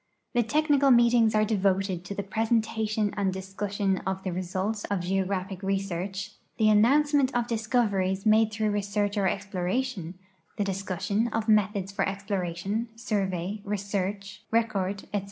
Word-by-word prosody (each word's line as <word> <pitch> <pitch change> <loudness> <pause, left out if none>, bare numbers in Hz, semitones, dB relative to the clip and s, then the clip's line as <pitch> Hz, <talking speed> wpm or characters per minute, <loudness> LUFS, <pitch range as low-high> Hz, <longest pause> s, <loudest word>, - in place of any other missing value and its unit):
The 240 - +3
technical 285 +3 +3
meetings 235 -2 +5
are 215 0 +4
devoted 195 -3 0
to 200 - -5
the 200 - -3
presentation 220 0 0
and 200 -2 +1
discussion 195 +1 -2
of 190 0 -3
the 185 - -2
results 185 +4 -2
of 200 -3 -1
geographic 190 +1 -2
research, 195 +1 -2 0.3
the 215 -1 +4
announce 275 +8 +4
ment 275 -2 +4
of 240 -1 +2
discoveries 215 -4 0
made 220 0 +4
through 215 0 0
research 205 0 -1
or 200 -2 +2
exploration, 195 0 -2 0.4
the 205 - +1
discussion 195 +3 -1
of 225 -1 -2
methods 205 -2 +2
for 195 -1 0
exploration, 195 +2 -3
survey, 200 -4 -2
research, 200 -1 -3
record, 200 -4 0
etc. 205 - +2
205 Hz, 140 wpm, -27 LUFS, 190-220 Hz, 0.4 s, meetings